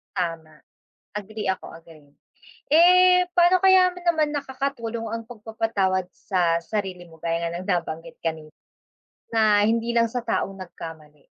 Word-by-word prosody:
Tama, 165 -3 -3 0.6
agree 210 0 -6
ako 190 - -3
agree. 155 -3 -18 0.6
Eh, 360 +3 +6
pano 350 +1 +5
kaya 375 -1 +6
mo 360 - -10
naman 310 -4 +1
nakakatulong 265 -5 -4
ang 230 +1 -4
pagpapatawad 215 -5 -1
sa 175 -4 0
sarili 185 -1 -4
mo 165 -1 -16
gaya 170 0 -1
nga - - -6
ng 185 - -8
nabanggit 165 -2 -3
kanina. 160 -2 -4 0.8
Na 215 -2 +4
hindi 230 +2 +1
lang 230 -1 +3
sa 240 0 -4
taong 195 -3 -2
nagkamali? 160 -5 -11
210 Hz, 135 wpm, -24 LUFS, 170-245 Hz, 0.8 s, Eh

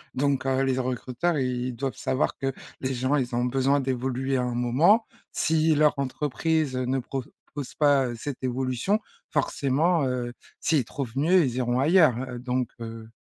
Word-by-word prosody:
donc, 140 0 +1
heu, 135 0 +2
les 135 -1 +1
z - - -1
recruteurs, 130 +6 -1
ils 125 -2 -1
doivent 135 +2 -3
savoir 130 - -1
que 135 0 -1 0.3
les 130 0 -1
gens, 130 +4 +1
ils 125 -3 -1
ont 120 +1 +1
besoin 135 +3 +2
d'évoluer 130 0 -1
à - - +1
un 125 -1 -2
moment. 145 - +4 0.3
Si 160 0 +2
leur 150 0 +4
entreprise 145 +2 -1
ne 130 +1 0
propose 135 +1 -7
pas, 140 -3 +4
heu, 120 - -4
cette 130 +3 -6
évolution, 130 - 0 0.3
forcément, 155 +3 +1
heu, 125 -1 -2 0.3
s'ils 150 -7 +2
trouvent 125 -2 -5
mieux, 170 +5 +4
ils 125 -2 -2
iront 125 0 +1
ailleurs, 155 -3 +5
heu, 125 -1 -6
donc, 125 0 -1
heu 115 -1 -7
130 Hz, 175 wpm, -26 LUFS, 125-145 Hz, 0.3 s, ailleurs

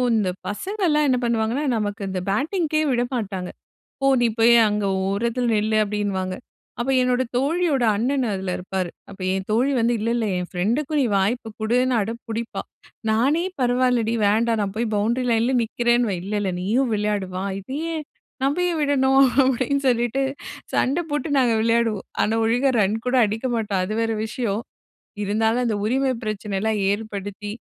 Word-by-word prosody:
இந்த 205 -4 +1 0.2
பசங்கள்லாம் 315 - 0
என்ன 255 - +3
பண்ணுவாங்கன்னா, 235 +3 0
நமக்கு 205 0 -3
இந்த 190 -1 -2
பேட்டிங்க்கே 310 - 0
விடமாட்டாங்க. 230 -7 -2 0.5
"போ! - - +1 0.2
நீ 240 - +4
போய் 235 +1 +6
அங்கே 205 -1 -1 0.2
ஓரத்தில 235 +5 -1
நில்லு" 215 +1 +1
அப்படின்னுவாங்க. 200 -3 -2 0.4
அப்போ 245 +3 0
என்னோட 250 0 +2
தோழியோட 295 -1 +1
அண்ணன் 260 +4 0
அதில் 190 -1 -3
இருப்பாரு. 185 0 -3 0.2
அப்ப 200 - -12
என் 190 0 -2
தோழி 245 +6 +2
வந்து 235 +1 +2
"இல்ல, 225 - -1
இல்ல 235 -2 0
என் 180 0 -4
ஃப்ரெண்டுக்கு 235 - -1
நீ - - +2
வாய்ப்பு 220 +4 0
கொடுன்னு" 250 +3 +2
அடம் 230 +4 -4
பிடிப்பா! 225 +1 -3 0.5
நானே 275 +10 +2 0.2
"பரவாயில்லடி 245 -2 +2
வேண்டாம் 225 +2 +2
நான் 195 -1 -2
போய் 230 -1 -1
பவுண்டரி 235 +5 0
லைன்லே 230 +3 +2
நிற்கிறேன்னுவேன்." 240 -3 +1
"இல்ல, 205 - -4
இல்ல 195 -2 -1
நீயும் 235 +6 +1
விளையாடு 210 -2 -1
வா! 190 - -3
இத 195 - -15 0.3
ஏன் 310 -2 -5 0.4
நம்ப 280 +3 +1
ஏன் 330 - -2
விடணும்?" 270 -2 +3 0.2
அப்பிடின்னு 265 +2 0
சொல்லிட்டு 240 +2 +1 0.5
சண்டை 290 +7 +1
போட்டு 295 +2 -1
நாங்க 245 -3 +3
விளையாடுவோம். 230 -2 +1 0.2
ஆனா, 220 - +1
ஒழுங்கா 245 +4 +2
ரன்கூட 225 +6 0
அடிக்க 220 +4 -4
மாட்டோம். 205 -4 -1
அது 215 - -4
வேற 225 0 0
விஷயம். 220 -2 -2 0.6
இருந்தாலும் 220 +4 +1
அந்த 225 -3 0
உரிமை 260 +3 +1
பிரச்சனை 210 -2 -3
எல்லாம் 220 0 0
ஏற்படுத்தி, 205 -1 -5
230 Hz, 155 wpm, -23 LUFS, 205-255 Hz, 0.6 s, போய்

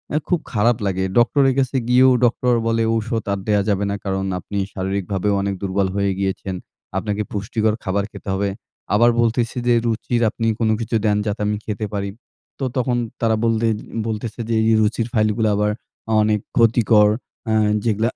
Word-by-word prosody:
এ - - +4
খুব 180 - +2
খারাপ 115 0 +2
লাগে। 95 -1 0
ডক্টরের 135 +3 +4
কাছে 135 0 0
গিয়েও 130 +1 +6 0.2
ডক্টর 125 +1 +2
বলে 115 0 +1
ঔষুধ 115 0 -2
আর 100 - -2
দেয়া 105 -1 +3
যাবে 100 0 +1
না - - -1
কারণ 95 0 -1
আপনি 100 +3 -6 0.2
শারীরিকভাবেও 95 +1 -1
অনেক 100 0 -1
দুর্বল 95 0 0
হয়ে 100 -1 +1
গিয়েছেন। 95 -1 -2 0.4
আপনাকে 105 +1 -2
পুষ্টিকর 105 +1 0
খাবার 100 +1 0
খেতে - - -9
হবে। 100 +1 0 0.5
আবার 120 +3 +5
বলতেছে 115 +1 0
যে 120 - +5
রুচির 115 +1 -1
আপনি 115 +1 -2
কোনো 110 -1 +2
কিছু 115 0 -2
দেন 105 -1 +3
যাতে 105 0 -2
আমি 105 - 0
খেতে 105 0 -3
পারি। 100 -1 -2 0.5
তো 135 - -1
তখন 125 -1 +1 0.2
তারা 110 -1 +3
বলতে 115 0 +2 0.4
বলতেছে 110 +1 -4
যে - - +1
এই - - +1
যে 110 - +5
রুচির 110 +2 0
ফাইলগুলো 110 0 +2
আবার 105 +1 +1 0.5
অনেক 105 0 +2 0.2
ক্ষতিকর। 110 -2 +5 0.4
অ্যা 110 - +1 0.3
যেগুলা 110 +1 +1
110 Hz, 175 wpm, -21 LUFS, 100-115 Hz, 0.5 s, গিয়েও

